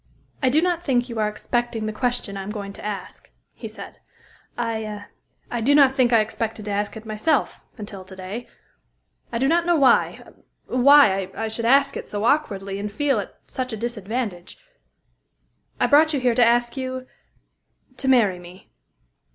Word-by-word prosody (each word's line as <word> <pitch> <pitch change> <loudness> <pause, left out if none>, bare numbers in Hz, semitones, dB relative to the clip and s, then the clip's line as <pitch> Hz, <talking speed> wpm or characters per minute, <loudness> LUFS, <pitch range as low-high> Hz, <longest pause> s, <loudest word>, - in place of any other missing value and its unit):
"I 260 - +3
do 305 +6 +3
not 350 -1 0
think 250 -4 +1
you 230 -2 -4
are 210 -1 +1
expecting 235 +1 -2
the 215 - -3
question 245 -3 -2
I 195 - -4
am 190 - -7
going 200 -2 -6
to - - -12
ask," 205 -3 -6 0.2
he - - -8
said. - - -10 0.6
"I 220 -3 -3 0.6
do 285 +4 +4
not 275 -2 +5
think 250 -3 +3
I 230 -2 +5
expected 220 0 -4
to 210 - -3
ask 205 +2 -2
it 220 - -11
myself, 220 +7 0 0.2
until 205 -3 -8
to 190 0 -12
day. 190 +6 -7 0.8
I 230 - -2
do 265 +3 +1
not 340 +3 +2
know 345 - +4
why 275 -4 +3 0.4
why 250 -8 +5
I 225 - -2
should 230 +1 -4
ask 275 +3 +4
it - - -6
so 205 0 -4
awkwardly, 200 -8 0
and 205 +1 -4
feel 285 +5 +1
at - - -7
such 255 -3 -4
a - - -3
disadvantage. 215 -4 -4 1.2
I - - +3
brought 310 +1 +5
you - - 0
here 250 -2 +2
to 245 +1 +4
ask 240 0 +2
you 260 -1 -4 0.9
to 265 - -2
marry 220 -9 +4
me." 180 +2 -14
230 Hz, 175 wpm, -23 LUFS, 210-260 Hz, 1.2 s, not